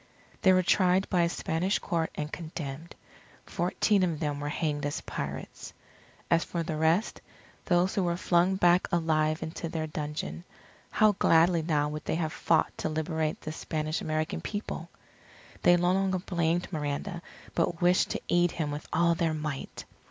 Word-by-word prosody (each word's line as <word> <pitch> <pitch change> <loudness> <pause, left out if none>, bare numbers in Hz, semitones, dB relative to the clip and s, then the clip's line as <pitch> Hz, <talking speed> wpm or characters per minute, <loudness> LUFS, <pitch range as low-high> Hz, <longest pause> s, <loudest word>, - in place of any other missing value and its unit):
They 190 - +6
were 185 0 +4
tried 185 +1 +3
by 180 -3 +3
a 170 - +2
Spanish 175 +3 0
Court 165 -2 -1
and 150 +1 -4
condemned. 160 -1 -6 0.5
Fourteen 190 +3 +1
of 170 -4 0
them 145 -2 -2
were 145 0 -3
hanged 150 -1 -2
as 145 - -3
pirates. - - -6 0.6
As 170 0 +4
for 170 -1 -3
the 160 -1 -3
rest, 160 +7 +1 0.4
those 180 0 +2
who 200 - +1
were 175 -1 0
flung 180 +1 +2
back 175 -1 +4
alive 155 -2 +1
into 160 +1 -5
their 160 -1 -2
dungeon, 150 - -5 0.5
how 215 -1 +4
gladly 165 +1 +4
now 150 -2 +1
would 150 +1 -6
they - - -1
have 160 -2 -2
fought 165 - +1
to - - -1
liberate 160 0 -2
the 155 - -5
Spanish 155 0 -3
American 155 0 -2
People! 205 0 -5 0.7
They 175 - +6
no 175 +1 +2
longer 190 -1 +1
blamed 175 -1 -1
Miranda, 155 +4 -3 0.3
but 165 -1 0
wished 180 +1 +3
to - - -3
aid 175 0 +3
him 150 -3 -2
with 145 +1 -6
all 170 +1 +3
their 165 -1 0
might. 150 -3 -5
165 Hz, 165 wpm, -29 LUFS, 155-175 Hz, 0.7 s, They